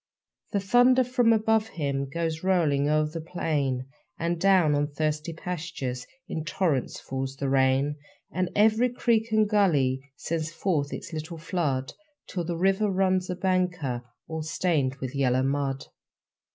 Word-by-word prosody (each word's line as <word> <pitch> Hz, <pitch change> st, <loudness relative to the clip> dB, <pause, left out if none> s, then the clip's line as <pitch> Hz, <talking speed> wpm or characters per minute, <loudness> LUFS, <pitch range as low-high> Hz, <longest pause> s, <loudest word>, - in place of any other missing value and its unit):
The 205 Hz, -, +1 dB
thunder 245 Hz, +6 st, +5 dB
from 245 Hz, -2 st, +3 dB
above 220 Hz, 0 st, +3 dB
him 140 Hz, -7 st, -2 dB
Goes 160 Hz, 0 st, -2 dB
rolling 155 Hz, -7 st, +2 dB
o'er 155 Hz, 0 st, +3 dB
the 160 Hz, +2 st, -5 dB
plain; 145 Hz, -6 st, -1 dB, 0.3 s
And 170 Hz, 0 st, -2 dB
down 185 Hz, -6 st, +5 dB
on 145 Hz, 0 st, +1 dB
thirsty 155 Hz, +2 st, -2 dB
pastures 160 Hz, -7 st, -5 dB, 0.2 s
In 160 Hz, -, -3 dB
torrents 155 Hz, -4 st, -1 dB
falls 135 Hz, 0 st, -4 dB
the 140 Hz, 0 st, -3 dB
rain. 135 Hz, +2 st, +2 dB, 0.3 s
And 185 Hz, -1 st, -1 dB
every 220 Hz, +4 st, +4 dB
creek 230 Hz, -2 st, +1 dB
and 215 Hz, -1 st, +4 dB
gully 140 Hz, -10 st, +2 dB
Sends 160 Hz, 0 st, -3 dB
forth 160 Hz, -5 st, -1 dB
its 170 Hz, -, -7 dB
little 160 Hz, +2 st, -5 dB
flood, 155 Hz, -6 st, -2 dB, 0.3 s
Till 175 Hz, -, -3 dB
the 170 Hz, 0 st, -3 dB
river 195 Hz, +4 st, +2 dB
runs 185 Hz, -1 st, +1 dB
a 180 Hz, -, -1 dB
banker, 180 Hz, -9 st, 0 dB, 0.3 s
All 160 Hz, 0 st, -4 dB
stained 155 Hz, -4 st, 0 dB
with 130 Hz, -2 st, -6 dB
yellow 130 Hz, -2 st, +2 dB
mud. 135 Hz, 0 st, -1 dB
160 Hz, 150 wpm, -27 LUFS, 140-190 Hz, 0.3 s, thunder